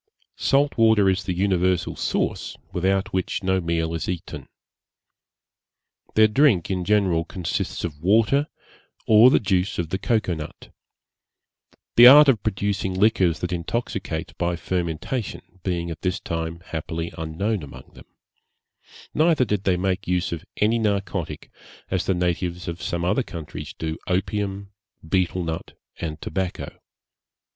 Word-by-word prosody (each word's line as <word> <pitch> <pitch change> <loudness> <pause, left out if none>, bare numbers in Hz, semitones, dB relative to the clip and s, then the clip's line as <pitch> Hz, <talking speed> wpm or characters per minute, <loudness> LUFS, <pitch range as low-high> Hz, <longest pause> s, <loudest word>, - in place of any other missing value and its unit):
Salt 140 -2 +2
water 110 -3 +5
is 95 +1 +1
the 90 - -1
universal 90 -2 +1
sauce, - - -2 0.2
without 95 +2 0
which 95 +1 -2
no 95 0 +1
meal 85 -1 -1
is 80 -3 -3
eaten. 90 -2 -5 1.7
Their 110 0 +7
drink 105 - +3
in 90 -1 -1
general 95 -5 +2
consists 85 0 -3
of 75 -4 -5
water, 115 - +3 0.6
or 110 +3 +7
the - - +4
juice 95 -2 0
of 85 -3 -2
the 95 - -2
cocoa 110 -4 0
nut; 75 -2 -9 1.2
the 120 +1 +11
art 145 +3 +10
of 115 -7 +3
producing 95 -1 -1
liquors 95 -4 +2
that 90 - -2
intoxicate 85 -2 -3
by 85 0 0
fermentation 90 - -4
being 85 -2 -2
at 80 - -8
this 90 0 -1
time 80 0 -4
happily 80 0 -5
unknown 85 +6 -2
among 70 - -11
them; - - -15 1.1
neither 155 -4 +3
did 100 -3 -2
they 90 -2 +2
make 95 +2 -1
use 90 -1 0
of 85 -2 -4
any 110 +3 +2
narcotic, 100 -5 -2 0.4
as 95 -2 -1
the 95 - +2
natives 90 0 -2
of 85 0 -5
some 85 0 -2
other 100 +9 +2
countries 85 - -7
do 80 0 -4
opium, 100 +1 -2 0.4
beetel 90 0 0
nut, 80 0 -5 0.2
and 80 -2 -4
tobacco. 95 -2 -4
95 Hz, 140 wpm, -23 LUFS, 85-105 Hz, 1.7 s, the